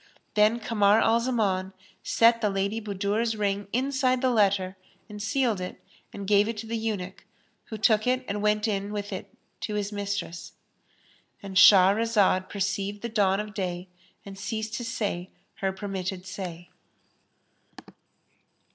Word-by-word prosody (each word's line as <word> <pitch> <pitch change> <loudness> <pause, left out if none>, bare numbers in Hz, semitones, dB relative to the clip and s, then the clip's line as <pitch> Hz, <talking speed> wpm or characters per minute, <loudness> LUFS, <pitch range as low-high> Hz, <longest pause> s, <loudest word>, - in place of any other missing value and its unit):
Then 215 +2 +3
Kamar 215 -2 +3
al 225 +1 +3
Zaman 200 -6 0 0.3
set 230 0 +4
the 210 - +2
Lady 200 +3 -1
Budur's 210 +2 -1
ring 205 -1 -1
inside 260 0 +1
the 255 0 +2
letter 195 -4 +2 0.3
and 210 -1 -8
sealed 230 -3 0
it 180 - -6 0.3
and 200 -1 -7
gave 205 +1 +4
it 230 -1 -3
to 215 - -5
the 230 +1 -3
eunuch, 210 -5 -4 0.4
who 220 - -7
took 215 +1 +3
it 255 0 +1
and 205 +1 -3
went 210 +1 +2
in 200 -1 -2
with 205 -1 -4
it - - -7 0.3
to 210 - -4
his 205 0 -2
mistress.—And 200 0 -8
Shahrazad 195 0 +5
perceived 200 +1 -2
the 235 - -2
dawn 200 -3 +2
of 210 0 -5
day 180 -2 -4 0.4
and 195 -1 -9
ceased 220 +2 -4
to 240 - -3
say 205 -6 -3 0.3
her 195 -1 -1
permitted 190 -2 -5
say. 180 -2 -7
205 Hz, 145 wpm, -27 LUFS, 195-225 Hz, 0.4 s, Shahrazad